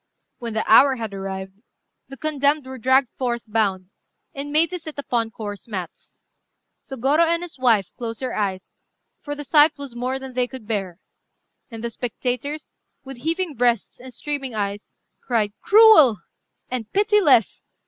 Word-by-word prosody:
When 230 -2 -5
the 220 - -1
hour 265 +4 +7
had 225 -4 -5
arrived, 195 0 -6 0.5
the 270 - -10
condemned 295 -1 +1
were 260 0 -8
dragged 260 +2 +3
forth 240 -2 -1
bound, 200 -4 -1 0.4
and 280 +1 -6
made 315 +3 +3
to 360 - -4
sit 315 -2 -9
upon 240 -5 -1
coarse 205 -2 -8
mats. 185 -6 -7 0.7
Sôgorô 270 +3 0
and 335 +1 0
his 340 -6 -9
wife 225 -7 +2
closed 230 -2 -5
their 255 -2 -3
eyes, 190 -3 -3 0.4
for 290 -1 -6
the 290 - -6
sight 300 +1 +4
was 280 -4 -9
more 255 +2 -2
than 265 -1 -8
they 250 0 0
could 255 -3 -10
bear; 195 -5 -3 0.7
and 225 -2 -9
the 235 - -3
spectators, 250 +5 -4 0.3
with 270 -1 -9
heaving 330 +5 -2
breasts 240 -3 0
and 255 +1 -11
streaming 275 -2 -5
eyes, 205 0 -3 0.3
cried 215 -4 0
"Cruel!" 420 - +7 0.5
and 245 -4 -5
"Pitiless!" 405 - +3
250 Hz, 160 wpm, -22 LUFS, 220-290 Hz, 0.7 s, hour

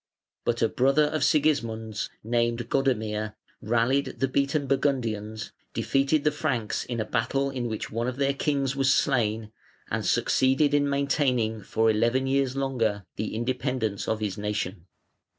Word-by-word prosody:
But 120 -1 +1
a - - +5
brother 135 +6 +3
of 155 +1 0
Sigismund's, 115 -8 +1
named 120 +1 0
Godamir, 110 -5 0 0.3
rallied 120 +5 +1
the 135 - +1
beaten 140 +2 0
Burgundians, 115 -6 -1 0.2
defeated 140 +2 +1
the 150 - +3
Franks 140 -8 -1
in 120 -2 -4
a 110 - 0
battle 135 +5 0
in 125 -3 -3
which 110 -2 -4
one 115 +2 -1
of 125 - -2
their 140 0 +2
kings 135 -1 0
was 135 -1 +3
slain, 115 -5 +1 0.4
and - - -1
succeeded 135 +3 +2
in 145 -1 +3
maintaining 130 -6 +1
for 110 +4 +1
eleven 115 +4 +2
years 135 -1 +1
longer 115 -7 -1
the 110 +1 -3
independence 125 -3 -2
of 110 -1 -1
his 105 -1 -2
nation. 100 -3 -3
125 Hz, 150 wpm, -27 LUFS, 110-135 Hz, 0.4 s, a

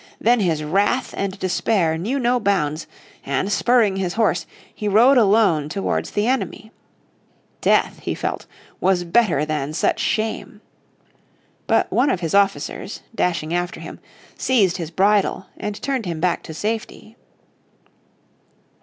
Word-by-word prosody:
Then 240 +2 +3
his 165 -6 0
wrath 200 +11 0
and 195 0 -3
despair 185 -2 +1
knew 210 +12 -2
no 250 -1 +1
bounds, 165 -8 0 0.4
and 140 +9 -1
spurring 225 -4 +3
his 185 -2 -2
horse, 200 -7 +1 0.3
he 210 - -4
rode 230 +7 +5
alone 200 -9 +3
towards 195 +5 -2
the 205 - -1
enemy. 245 -3 -2 0.9
Death, - - +2
he - - -3
felt, - - -4 0.3
was 185 -1 +2
better 175 -5 +2
than 150 -1 -3
such 160 - 0
shame. 220 -1 -2 1.1
But - - +2
one 270 +3 +3
of 180 - -1
his 165 -2 -3
officers, 200 +1 0
dashing 170 -6 -1
after 175 0 -2
him, - - -9 0.4
seized 205 -9 +2
his 165 -4 -5
bridle 195 +2 +2
and 210 0 -5
turned 265 -7 -2
him 165 -2 -3
back 180 +1 0
to - - -5
safety. 220 +3 -4
195 Hz, 135 wpm, -21 LUFS, 170-220 Hz, 1.1 s, rode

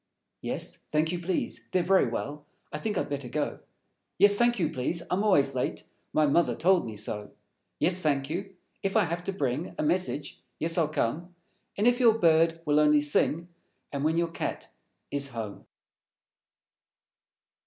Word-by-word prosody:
Yes, - - -4
thank 155 +1 +2
you, 175 - -2
please. 175 +1 -3
They're 185 -1 +3
Very 190 +1 +4
Well; 145 +1 -4 0.3
I 150 - -3
think 210 +4 -2
I'd - - 0
better 140 -3 -4
go. 150 +4 -2 0.6
_Yes, 205 +1 +7
thank 240 +3 +2
you, 170 -6 0
please. 165 +7 -1
I'm 190 +3 +1
always 190 -10 +3
late; - - -2 0.3
My 155 - +3
Mother 155 +4 +2
told 185 -2 +3
me 110 - -6
so. 105 0 -4 0.5
Yes, 180 - +2
thank 140 -5 0
you! 190 +5 -5 0.3
If 195 +3 0
I 215 - +5
Have 170 +1 -3
to - - -1
Bring 150 -3 -2
A - - -1
message, 150 -3 -1 0.2
yes, 165 +1 0
I'll 165 -3 +2
come; 160 +5 -2 0.4
And 205 - +1
if 245 +1 +4
your 230 -3 +5
Bird 165 -2 +3
will 150 0 +3
only 150 0 +5
Sing; 150 +3 +1 0.4
And 140 -1 -3
when 160 +2 +2
your 170 -1 +1
Cat - - -4 0.4
is 140 -1 0
home. 110 -5 -7
165 Hz, 170 wpm, -28 LUFS, 145-185 Hz, 0.6 s, Yes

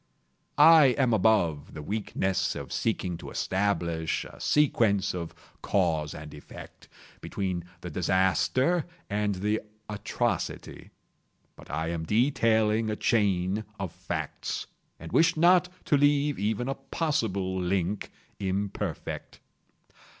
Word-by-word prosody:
I 150 -4 +7
am 130 -4 +3
above 90 -8 +2
the 75 - -6
weakness 95 -1 -1
of - - -6
seeking 95 -6 -1
to - - -8
establish 85 -5 -1
a - - -12
sequence 115 -9 +2
of 85 -2 -5 0.3
cause 75 -2 0
and 75 -1 -9
effect, 75 - -12 0.3
between 90 -3 -3 0.2
the 90 - -6
disaster 95 - +2 0.2
and 105 -1 0
the 105 +4 -1 0.3
atrocity. 105 -1 -3 0.7
But - - -15
I 80 +2 -2
am 85 -1 -3
detailing 110 - +2
a 105 - -1
chain 100 -2 +1 0.2
of - - -3
facts—and 80 - -6
wish 160 0 +3
not 180 +2 +5 0.2
to 145 - +3
leave 145 0 +2
even 110 +4 -1
a 135 - 0
possible 115 - -2
link 95 +2 -1 0.3
imperfect. 100 -2 -4
100 Hz, 115 wpm, -28 LUFS, 90-125 Hz, 0.7 s, I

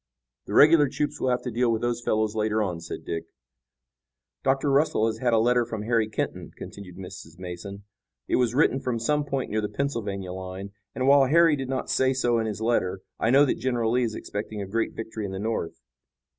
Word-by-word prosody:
"The - - -3
regular 150 -2 +7
troops 145 +2 -2
will 130 - +1
have 125 0 0
to 125 - -3
deal 120 +1 +2
with 110 0 -1
those 120 0 0
fellows 110 -2 0
later 110 0 +1
on," 90 -4 -3
said 85 - -7
Dick. 80 0 -3 1.2
"Dr. 135 +1 +1
Russell 140 -5 +3
has 110 0 -1
had 125 0 +1
a 115 - +4
letter 120 +2 +3
from 110 -2 -5
Harry 115 -1 +1
Kenton," 105 - -3
continued 90 -3 -10
Mrs. 90 -3 -10
Mason. 90 +2 -7 0.4
"It - - +2
was 125 -1 +1
written 135 -2 +3
from 125 -3 -2
some 150 +6 +1
point 135 -2 -3
near 110 +1 0
the 105 - -2
Pennsylvania 105 -7 -3
line, 95 +1 -7 0.2
and, 130 0 0
while 140 -1 +6
Harry 165 +2 +5
did 135 -2 -5
not 130 -1 -2
say 130 0 +3
so 120 -3 +1
in 110 - -1
his 105 0 -4
letter, 100 -5 0 0.2
I 115 - +1
know 140 +4 +6
that 135 - -1
General 120 -3 0
Lee 125 +1 +2
is 115 -3 -1
expecting 105 +1 -5
a 100 - -3
great 115 +4 -2
victory 110 -1 -5
in 95 -1 -4
the - - -4
North. 110 -5 -3
115 Hz, 215 wpm, -26 LUFS, 105-130 Hz, 1.2 s, regular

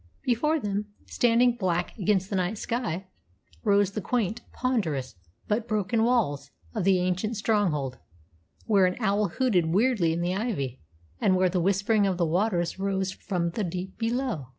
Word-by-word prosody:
Before 300 +6 +1
them, 205 -3 -2 0.2
standing 240 0 +3
black 180 -4 -1
against 195 -2 0
the - - 0
night 185 +3 0
sky, 205 -6 -3 0.6
rose 200 -3 +3
the 215 - -4
quaint, 230 0 -1
ponderous, 165 - -1 0.3
but 220 +2 0
broken 215 +1 +1
walls 165 - +1 0.2
of - - -2
the 195 -1 +5
ancient 185 +5 -1
stronghold, 180 - 0 0.7
where 200 -4 +4
an 180 - -2
owl 205 -2 +2
hooted 210 -11 +1
weirdly 200 -1 +2
in 165 +1 -1
the 175 +1 0
ivy, 180 - -3 0.4
and 185 - +3
where 185 0 +3
the 180 0 0
whispering 200 +3 +2
of 185 -2 0
the 175 - +2
waters 175 +1 0
rose 190 -1 -1
from 175 -4 -2
the 210 +4 -2
deep 185 +1 -5
below. 230 - -1
195 Hz, 160 wpm, -27 LUFS, 180-225 Hz, 0.7 s, the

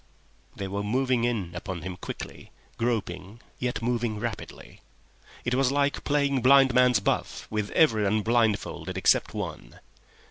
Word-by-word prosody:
They 100 - -4
were 100 +1 -3
moving 125 +3 +1
in 105 -8 -1
upon 85 -1 -6
him 90 0 -5
quickly, - - -8 0.3
groping, 105 -3 -3 0.2
yet 125 -2 -2
moving 120 -3 -1
rapidly. 115 -2 -7 0.6
It 120 - 0
was 130 0 +2
like 140 0 0
playing 140 -2 +1
blind 135 +1 +6
man's 125 -3 +5
buff 100 - -2
with 105 -1 -2
everyone 110 -7 +3
blindfolded 115 -2 0
except - - +2
one. - - -6
115 Hz, 135 wpm, -27 LUFS, 100-125 Hz, 0.6 s, blind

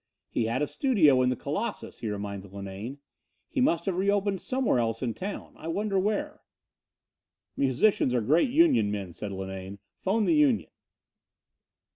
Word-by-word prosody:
"He 115 - 0
had 120 +5 0
a - - +3
studio 155 - +3
in 125 - +3
the 125 - 0
Colossus," - - -4
he 110 - -3
reminded 100 -1 -5
Linane. 100 +6 -6 0.5
"He 265 - 0
must 170 -9 +2
have 195 - 0
re 195 +2 +1
opened 200 -2 +1
somewhere 255 - +1
else 115 +1 -1
in 120 -3 -1
town. 195 - -6
I 160 - -9
wonder 195 +3 0
where." 205 +2 -1 1.1
"Musicians 135 - +2
are 120 - +2
great 155 - +3
union 285 - +4
men," 100 -4 -4
said 100 +4 -5
Linane. 95 0 -6 0.2
"Phone 210 +3 +1
the - - +3
union." 295 -6 +3
140 Hz, 160 wpm, -28 LUFS, -, 1.1 s, union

